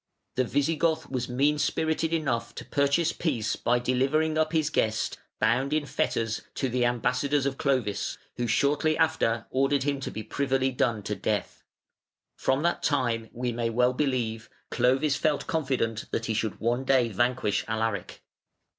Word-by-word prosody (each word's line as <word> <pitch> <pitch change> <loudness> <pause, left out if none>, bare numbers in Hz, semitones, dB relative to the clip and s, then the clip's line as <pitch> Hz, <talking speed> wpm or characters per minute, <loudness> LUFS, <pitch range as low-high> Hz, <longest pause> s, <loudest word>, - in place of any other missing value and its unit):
The 130 - +1
Visigoth 160 +4 0
was 125 -1 -2
mean 145 +4 +2
spirited 160 +1 0
enough 135 -8 -1
to - - -7
purchase 140 +4 +2
peace 130 -11 -1
by 120 +1 +1
delivering 135 +6 +1
up 155 0 +1
his 160 -2 +1
guest, 110 0 0 0.2
bound 125 +6 +2
in 155 -1 +1
fetters, 115 -5 -1
to 135 - -1
the 125 0 +1
ambassadors 125 +4 +1
of 135 -1 -2
Clovis, 130 -8 0 0.2
who 120 - -1
shortly 145 +6 +2
after 155 -9 +1
ordered 135 +1 +2
him 140 -1 0
to 135 - -4
be 110 - -6
privily 135 0 0
done 115 -4 0
to 105 - -2
death. 105 +2 -2 0.7
From 135 +3 0
that 170 - +1
time, 120 -6 0
we 125 0 -2
may 115 0 -1
well 125 +2 +2
believe, 120 -5 -1 0.2
Clovis 130 +4 +2
felt 150 -2 0
confident 130 -8 -1
that 115 - -2
he 115 - -1
should 110 -1 -2
one 120 +3 0
day 130 -3 +3
vanquish 120 0 0
Alaric. 110 -4 -2
130 Hz, 160 wpm, -27 LUFS, 115-145 Hz, 0.7 s, day